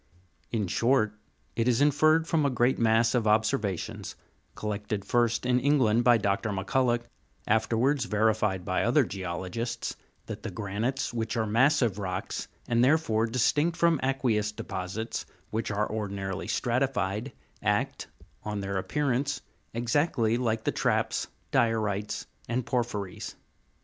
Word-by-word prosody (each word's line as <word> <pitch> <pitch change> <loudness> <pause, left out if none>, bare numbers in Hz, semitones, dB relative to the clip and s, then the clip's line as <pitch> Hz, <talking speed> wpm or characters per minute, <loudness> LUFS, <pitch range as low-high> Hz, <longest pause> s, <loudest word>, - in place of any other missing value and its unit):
In 110 -3 0
short, 110 +3 +2 0.4
it 115 - +1
is 120 -2 +3
inferred 155 +3 +4
from 160 -2 +2
a 140 - +3
great 125 0 +2
mass 115 0 +3
of 120 -3 +1
observations, 105 -3 0 0.4
collected 105 -1 -3
first 120 +1 +1
in 125 0 +3
Eng 140 +4 +3
land 115 -2 +3
by 120 -1 +6
Dr. 100 +1 0
Macculloch, 120 +5 +1 0.4
afterwards 115 +5 +2
verified 105 -4 +1
by 95 - 0
other 130 +5 +4
geologists, 95 +5 -4 0.3
that - - -6
the - - -4
granites, 115 +6 -2
which 115 0 -2
are 110 - +1
massive 120 -1 +3
rocks, 95 -1 -3 0.2
and 120 0 +3
therefore 125 -6 +3
distinct 145 +8 +1
from 170 -3 +3
aqueous 120 -6 +1
deposits, 100 +3 -5 0.2
which 110 +1 -2
are 105 0 0
ordinarily 100 -3 -3
stratified, 120 -2 0 0.3
act, - - 0 0.4
on 105 -1 -3
their 100 0 -2
appearance, 140 +5 0 0.3
exactly 115 -1 +1
like 115 -2 0
the - - +1
traps, - - 0 0.2
diorites, 105 -3 0 0.2
and 120 0 -1
porphyries. 115 -6 -3
115 Hz, 130 wpm, -28 LUFS, 105-125 Hz, 0.4 s, by